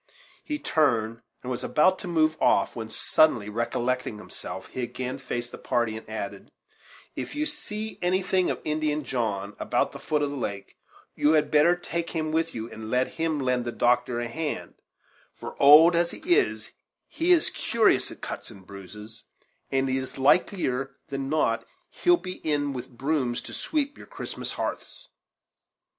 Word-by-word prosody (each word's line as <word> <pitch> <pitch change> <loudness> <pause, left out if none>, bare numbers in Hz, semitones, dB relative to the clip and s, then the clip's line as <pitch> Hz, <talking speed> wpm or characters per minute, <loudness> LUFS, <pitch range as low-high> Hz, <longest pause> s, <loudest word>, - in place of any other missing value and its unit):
He 300 - -3
turned, 115 - +1 0.2
and 130 - -4
was 125 - -3
about 185 +5 +3
to 190 - -7
move 155 -2 +2
off, 100 - +3
when, 110 -1 -5
suddenly 115 -5 +2
recollecting 120 +1 -1
himself, - - -8
he 130 - -5
again 125 +1 -4
faced 120 -2 -4
the - - -9
party, 120 -2 0
and 110 - -9
added: 100 -2 -5 0.7
"If - - -5
you 300 +1 0
see 220 -8 -5
anything 185 0 +2
of - - -2
Indian 155 0 0
John, 105 -6 -2
about - - +1
the - - -9
foot 150 -1 0
of 145 - -1
the - - -5
lake, 100 -7 -5 0.4
you 150 +2 +3
had 150 -2 +2
better 155 +4 +5
take 170 -1 -4
him 155 -2 -2
with 165 +1 0
you, 110 0 -4
and 110 0 -7
let 125 +2 +2
him 160 -2 -1
lend 125 -2 +1
the 120 - -3
doctor 120 0 +2
a 120 - -2
hand; 150 +6 -4 0.6
for, - - -8
old 155 +5 +9
as 170 0 +2
he - - -7 0.2
is, 425 - 0 0.4
he 340 +2 0
is 345 -2 +4
curious 230 -1 +2
at - - -12
cuts - - -5
and 95 -2 -13
bruises, 105 +3 -10 0.4
and 135 0 +1
it's 130 0 -2
likelier 135 -2 +2
than 135 -1 -3
not 155 +1 +1 0.3
he'll 355 0 +4
be 185 - -7
in 145 -2 -1
with 125 -2 -6
brooms 135 -4 0
to - - -10
sweep 290 -2 -2
your - - -12
Christmas - - -5
ha'arths." - - -5
140 Hz, 170 wpm, -26 LUFS, 120-165 Hz, 0.7 s, old